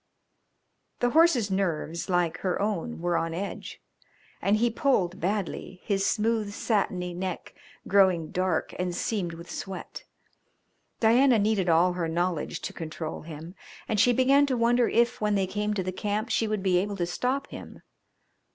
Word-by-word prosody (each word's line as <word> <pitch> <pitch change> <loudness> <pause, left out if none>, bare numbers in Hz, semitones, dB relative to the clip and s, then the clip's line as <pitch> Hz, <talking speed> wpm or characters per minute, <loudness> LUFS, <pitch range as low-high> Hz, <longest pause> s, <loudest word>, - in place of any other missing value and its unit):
The 245 0 +1
horse's 290 -10 +4
nerves, 170 -3 -2
like 175 -2 +1
her 185 -2 -1
own, 205 0 -2
were 175 0 0
on 165 0 -1
edge, 195 +3 -6 0.6
and 205 +2 +3
he 235 +2 +2
pulled 200 -8 +1
badly, 190 -1 -3
his 195 -2 0
smooth 215 -1 0
satiny 185 -5 -1
neck 180 0 -5 0.3
growing 185 -5 +3
dark 185 -3 -1
and 180 -1 -1
seamed 185 -6 -2
with 170 +1 -10
sweat; 190 -2 -7 0.9
Diana 240 +2 +5
needed 205 -3 +1
all 170 +2 +4
her 175 -2 -2
knowledge 170 0 -2
to - - -5
control 160 -1 -6
him, 160 +2 -9 0.3
and 215 - 0
she 245 +4 +5
began 270 +3 +4
to 260 -2 0
wonder 235 +1 +3
if 235 0 +2
when 210 -1 +1
they 195 -1 +2
came 210 +2 -2
to 190 - -1
the 185 - -3
camp 210 +4 -2
she 225 0 +1
would 210 -2 -2
be 185 -2 +3
able 205 +2 -2
to 175 -3 -1
stop 250 +11 -1
him. - - -10
195 Hz, 160 wpm, -27 LUFS, 175-220 Hz, 0.9 s, Diana